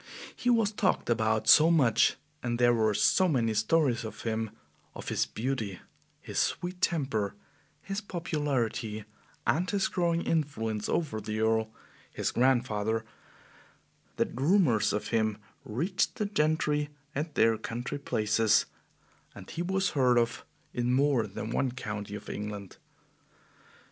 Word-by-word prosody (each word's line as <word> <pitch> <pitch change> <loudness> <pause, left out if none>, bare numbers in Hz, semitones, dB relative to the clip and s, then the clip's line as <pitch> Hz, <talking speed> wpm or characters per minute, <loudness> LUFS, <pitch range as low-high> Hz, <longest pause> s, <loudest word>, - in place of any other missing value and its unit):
He 245 - -1
was 225 -4 +3
talked 195 - 0
about 110 -1 +1
so 160 +1 +8
much 140 -10 +4 0.2
and 120 -1 -1
there 120 0 +4
were 110 -2 +2
so 185 - +4
many 120 -8 +1
stories 120 +3 +2
of 110 - -7
him 110 -1 -1 0.5
of - - -6
his 65 - 0
beauty, 110 - -3 0.4
his - - -4
sweet 180 +1 -1
temper, 130 - 0 0.5
his 195 +1 -3
popularity, 130 - -2 0.4
and 180 +5 +1
his 200 +1 +1
growing 170 -4 0
influence 115 -9 -1
over 125 -10 -1
the 110 +1 -3
Earl, 110 0 +2 0.4
his - - -2
grandfather 115 -3 +1 1.1
that - - 0
rumors 135 - +3
of 105 - -2
him 110 -2 +1 0.3
reached 165 - -1
the 210 - -1
gentry 150 -5 +1 0.2
at 150 +2 -3
their 115 0 +4
country 120 +5 -5
places 110 -4 +2 0.7
and - - -11
he 170 - -4
was 190 +1 0
heard 125 -3 +3
of 115 -1 0 0.3
in 120 0 0
more 135 -4 +2
than 105 +3 -6
one 130 0 0
county 105 -4 -5
of 105 - -9
England. 105 -2 -6
120 Hz, 135 wpm, -29 LUFS, 110-155 Hz, 1.1 s, so